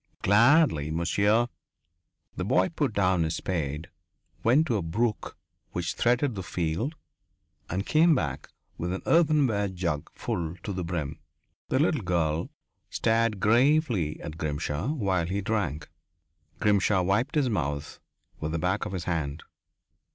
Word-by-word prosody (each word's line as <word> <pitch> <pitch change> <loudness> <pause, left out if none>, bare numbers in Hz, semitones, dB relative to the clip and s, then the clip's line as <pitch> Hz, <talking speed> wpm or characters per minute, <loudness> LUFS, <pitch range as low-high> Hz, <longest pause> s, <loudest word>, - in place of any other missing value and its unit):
"Gladly, 105 - +4
monsieur." 100 +8 +2 0.9
The 90 - -3
boy 105 - +2
put 150 -6 -1
down 95 -4 +2
his 80 0 0
spade, 75 -3 -3 0.6
went 135 +8 +4
to 120 -8 0
a - - -1
brook 105 +7 -2 0.4
which 90 0 -2
threaded 125 +2 +1
the 95 - -5
field 85 - -2 0.7
and 95 +4 -2
came 160 +1 +4
back 75 - -3 0.3
with 90 +2 -2
an 95 - -5
earthenware 145 -11 +3
jug 85 -6 -3
full 85 0 -3
to 100 - -3
the 90 -1 -3
brim. 80 -3 -4 0.5
The - - +1
little - - +2
girl 85 -3 0 0.4
stared 115 -2 +1
gravely 120 - +2
at 80 0 -7
Grimshaw 75 - -2
while 95 - 0
he 95 +3 -1
drank. 95 -8 -2 0.7
Grimshaw 100 -2 +3
wiped 100 - 0
his 145 -3 +3
mouth 75 -6 -3 0.4
with 80 0 -3
the - - 0
back 90 +4 0
of - - -7
his 90 -2 -3
hand. 80 -4 -3
95 Hz, 140 wpm, -27 LUFS, 80-115 Hz, 0.9 s, Gladly